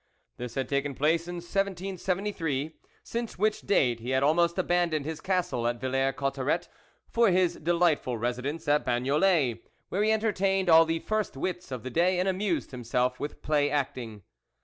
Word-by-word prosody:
This 120 -1 -6
had 130 -2 -1
taken 140 +1 -1
place 160 +5 +1
in 175 - -5
1773, 180 -4 -2 0.3
since 235 -1 -4
which 215 +3 +1
date 125 - +2
he 120 +2 -6
had 130 +1 +2
almost 170 +4 +3
abandoned 175 -5 +1
his 160 0 -5
castle 180 -11 0
at 120 0 -1
Villers 135 +1 0
Cotterets 135 0 -1 0.4
for 230 -2 +3
his 180 -1 +2
delightful 165 -7 +1
residence 125 +7 -3
at 150 +1 +3
Bagnolet, 135 - +2 0.3
where 195 - -1
he 215 - +3
entertained 195 -4 +1
all 165 0 +8
the 165 0 0
first 215 -9 -2
wits 180 +3 -3
of 130 -4 -5
the 130 - -5
day 180 +5 +2
and 185 - +1
amused 190 -3 -1
himself 125 0 -1
with 145 - -6
play 145 -1 +2
acting. 125 -7 -3
160 Hz, 165 wpm, -28 LUFS, 130-185 Hz, 0.4 s, all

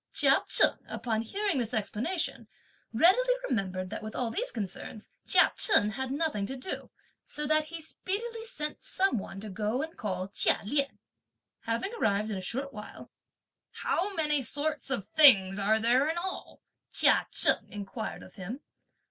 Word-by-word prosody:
Chia - - +3
Cheng, - - +6
upon 220 0 -2
hearing 390 - -2
this 230 -3 -3
explanation, 245 - -2 0.4
readily 425 - +4
remembered 185 -5 -3
that 220 - -5
with 215 0 -8
all 240 -3 -2
these - - -2
concerns 210 0 -7 0.2
Chia - - +4
Chen 215 - +4
had 265 +3 -4
nothing 280 -9 -1
to 270 - -5
do; 260 +8 -7 0.3
so 300 - -4
that 310 +1 +2
he 330 +2 -8
speedily 440 +8 -5
sent 305 -11 -5
some 380 - 0
one 195 0 -8
to 215 - -7
go 215 +7 -2
and 320 +1 -8
call 185 -4 -4
Chia 200 - +2
Lien. 275 +4 0 0.7
Having 230 - -2
arrived 215 - 0
in 200 - -3
a - - -5
short 270 +8 -4
while, 210 0 -10 0.7
"How 395 +3 -1
many 300 -3 +1
sorts 290 +3 -1
of 240 -8 -1
things 205 -7 +5
are 215 +2 +2
there 250 +6 +2
in 325 - -2
all?" 370 +2 -6 0.3
Chia - - +4
Cheng - - +6
inquired 205 +2 -6
of - - -15
him. 210 +9 -7
255 Hz, 165 wpm, -29 LUFS, 210-315 Hz, 0.7 s, Cheng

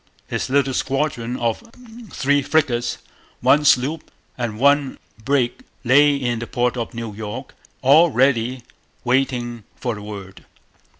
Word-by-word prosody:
His - - -3
little 135 0 +2
squadron 130 -3 -1
of 115 -2 -1 0.5
three 145 +1 +1
frigates, 135 -5 0 0.4
one 150 +1 +4
sloop, 145 +3 +2 0.3
and 120 -4 -4
one 140 +2 +2 0.3
brig 135 - 0 0.2
lay 145 +3 +5
in 120 -4 -2
the 115 - -5
port 120 0 0
of 120 -1 -5
New 115 -2 -5
York, 110 +5 -7 0.3
all 155 +6 +6
ready 125 -2 +1 0.4
waiting 125 -2 -1
for 120 -2 -3
the 105 - -8
word. 100 -3 -9
125 Hz, 130 wpm, -21 LUFS, 115-140 Hz, 0.5 s, all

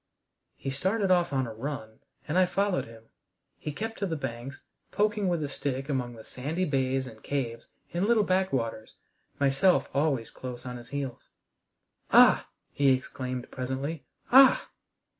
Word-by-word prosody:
He 135 - -4
started 190 +8 0
off 175 -3 +3
on 135 -2 +1
a 115 - -6
run, 110 -2 -6 0.3
and 150 - -2
I 185 0 +5
followed 195 0 0
him. 115 -1 -14 0.6
He 150 - -4
kept 225 +8 -5
to 200 - 0
the 165 - -2
banks, 130 0 -5 0.3
poking 210 -1 +1
with 170 -3 0
a - - -1
stick 135 0 -3
among 125 -4 -2
the 110 - -11
sandy 155 +11 -3
bays 135 -2 0
and 110 -4 -11
caves 120 -5 -3 0.3
and 180 +4 +1
little 230 -2 +4
back 190 0 +1
waters, 115 -3 -3 0.4
myself 140 +7 +3
always 140 -5 0
close 125 -1 -8
on 125 -1 -5
his 120 - -12
heels. 140 -3 -5 0.8
"Ah!" - - +6 0.2
he 140 -1 +3
exclaimed 130 -1 -3
presently, 135 +4 -3 0.3
"ah!" 265 +1 +7
140 Hz, 160 wpm, -28 LUFS, 125-180 Hz, 0.8 s, ah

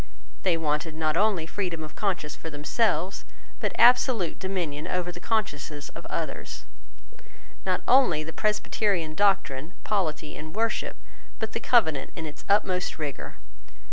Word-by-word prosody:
They 180 -3 +2
wanted 155 0 -1
not 155 -1 +1
only 200 -4 +2
freedom 170 -2 -3
of 155 - -8
conscience 180 -7 -1
for 160 - -7
themselves, 180 +5 0 0.4
but - - 0
absolute 240 -7 +5
dominion 175 -6 -2
over 180 -1 -1
the 175 - -9
consciences 150 -9 -2
of - - -9
others; - - -4 1.0
not - - +1
only 255 - +5
the 160 +1 -7
Presbyterian 205 -4 0
doctrine, 180 -5 +1
polity, 155 -7 -1
and 155 +3 -8
worship, 225 0 0 0.4
but 220 -1 -3
the - - -2
Covenant 160 - +3
in 165 - -5
its 150 -1 -9
utmost 185 -3 +2
rigour. 150 -4 -5
175 Hz, 140 wpm, -27 LUFS, 155-205 Hz, 1.0 s, absolute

